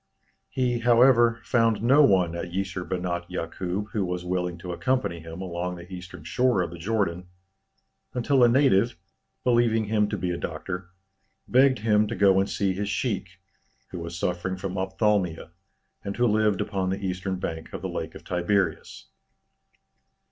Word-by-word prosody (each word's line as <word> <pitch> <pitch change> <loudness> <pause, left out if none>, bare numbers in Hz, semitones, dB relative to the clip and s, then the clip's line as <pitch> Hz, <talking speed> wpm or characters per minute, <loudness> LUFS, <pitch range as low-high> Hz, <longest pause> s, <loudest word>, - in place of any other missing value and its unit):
He, 125 -2 0
however, 120 0 +5
found 115 -2 +2
no 135 +5 +6
one 90 - +4
at 85 +1 -4
Jisr 95 0 -3
Benat 90 -1 -3
Yakûb 90 +5 -4
who 105 - 0
was 90 -1 -3
willing 90 -1 -2
to 90 +1 -7
accompany 125 -4 -1
him 80 +3 -8
along 90 0 -3
the 90 +2 -11
eastern 90 -3 -9
shore 120 +3 +2
of 85 - -5
the 85 - -9
Jordan, 90 -2 -1 0.9
until 125 +1 +3
a - - +8
native, 120 -3 +3 0.5
believing 120 -2 +3
him 105 0 +1
to 105 - -2
be 90 0 -2
a 85 - -2
doctor, 90 +3 -5 0.6
begged 130 +1 +4
him 105 -1 +2
to 115 - -4
go 95 0 +4
and 95 - 0
see 95 -2 0
his 100 +2 -3
sheik, 100 -6 -2 0.5
who 90 - -5
was 85 0 -6
suffering 90 +2 -2
from 95 0 -5
ophthalmia, 95 -3 0 0.5
and 100 - -5
who 120 - +3
lived 105 -3 +2
upon 95 -2 -1
the 95 +1 -3
eastern 95 +1 -2
bank 80 -3 -5
of - - -7
the - - -1
Lake - - -5
of - - -10
Tiberias. 90 +3 -1
95 Hz, 165 wpm, -26 LUFS, 90-115 Hz, 0.9 s, a